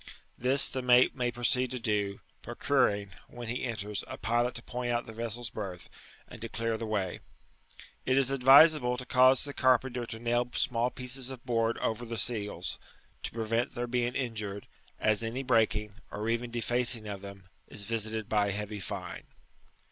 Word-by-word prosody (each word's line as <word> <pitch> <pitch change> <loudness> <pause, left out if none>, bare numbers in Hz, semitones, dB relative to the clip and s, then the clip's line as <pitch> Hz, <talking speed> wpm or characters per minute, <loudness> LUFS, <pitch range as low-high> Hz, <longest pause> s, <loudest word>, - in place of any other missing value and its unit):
This 130 +3 +2
the 130 - -3
mate 125 0 +5
may 125 -2 0
proceed 125 +1 +1
to 125 - -3
do, 105 -4 -1 0.2
procuring, 100 -1 +1 0.2
when 120 -1 -8
he 125 - -2
enters, 105 -4 -3
a - - -7
pilot 120 +2 0
to 115 - -8
point 125 -1 -3
out 120 0 0
the 110 - -9
vessel's 115 +1 -4
berth, 95 -4 -6 0.4
and - - -11
to 115 - -4
clear 115 0 -1
the 110 0 -4
way. 100 -4 -1 0.8
It 130 +1 +2
is 135 -1 +3
advisable 135 -1 +6
to 125 - -6
cause 130 +1 +5
the 140 - -6
car 130 -2 +5
penter 125 -1 -5
to 115 - -6
nail 120 +1 0
small 120 0 +1
pieces 125 0 -3
of 130 -2 -9
board 115 -1 +1
over 110 +1 -2
the 115 -1 -5
seals, 105 -3 -2 0.4
to - - -3
prevent 115 +2 -1
their 120 0 -1
being 120 0 -1
injured, 105 -6 -3 0.3
as 110 0 +2
any 115 +4 -3
breaking, 110 -4 +2 0.2
or 105 +2 -4
even 115 +1 -1
defacing 120 -1 +1
of 100 -2 -5
them, 100 -1 -11 0.2
is 100 - -6
visited 110 0 -2
by 105 -1 +2
a - - 0
heavy 105 +1 -4
fine. 95 -4 -6
115 Hz, 180 wpm, -30 LUFS, 110-125 Hz, 0.8 s, advisable